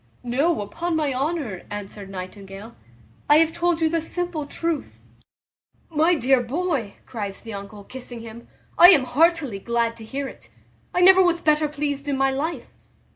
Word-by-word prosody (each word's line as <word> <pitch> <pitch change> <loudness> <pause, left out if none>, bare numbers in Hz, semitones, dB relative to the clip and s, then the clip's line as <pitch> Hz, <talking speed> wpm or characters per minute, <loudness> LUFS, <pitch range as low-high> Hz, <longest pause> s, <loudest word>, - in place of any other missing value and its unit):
"No, 275 +5 +1
upon 330 +12 -3
my 300 -3 0
honour," 270 - -2
answered 205 -1 -7
Nightingale, 195 +3 -9 0.5
"I 295 - +8
have 325 0 +3
told 340 -1 0
you 320 - +4
the 330 +1 0
simple 340 -2 -3
truth." 330 0 -4 0.9
"My 325 +3 +3
dear 265 -2 +3
boy," 265 - -2
cries 205 -4 -6
the 225 -2 -8
uncle, 200 +1 -8
kissing 245 +1 -9
him, 230 +1 -11 0.3
"I 350 - +11
am 310 -8 +6
heartily 290 - +2
glad 235 +1 0
to 225 - -10
hear 275 +5 -4
it. - - -13 0.4
I 360 - 0
never 380 +1 +8
was 350 -2 +3
better 305 -1 +2
pleased 290 -1 -3
in 280 -2 0
my 270 0 +2
life. 305 +6 -4
280 Hz, 165 wpm, -23 LUFS, 225-325 Hz, 0.9 s, I